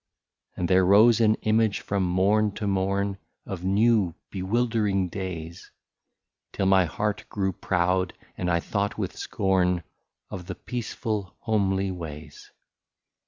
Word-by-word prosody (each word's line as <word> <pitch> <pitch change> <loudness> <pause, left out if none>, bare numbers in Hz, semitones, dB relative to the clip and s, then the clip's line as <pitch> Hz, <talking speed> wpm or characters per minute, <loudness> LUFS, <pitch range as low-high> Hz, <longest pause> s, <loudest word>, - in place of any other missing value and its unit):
And 90 - -1
there 95 +1 +4
rose 110 +5 +6
an 110 -1 +4
image 110 -1 +2
from 100 -1 -1
morn 100 +4 +2
to 105 - -4
morn 100 0 0 0.3
Of 90 -3 -6
new 100 -2 +3 0.2
bewildering 100 -1 0
days, 85 -3 -6 0.8
Till 95 - -1
my 95 -1 +5
heart 105 +5 -3
grew 95 -2 -1
proud, 90 +1 0 0.2
and 90 - -2
I 85 -1 +2
thought 100 +2 -2
with - - -3
scorn 90 -3 0 0.5
Of 90 -1 -7
the 95 - -5
peaceful 110 -5 -4
homely 100 -4 +1
ways. 75 -4 -9
95 Hz, 125 wpm, -26 LUFS, 90-105 Hz, 0.8 s, rose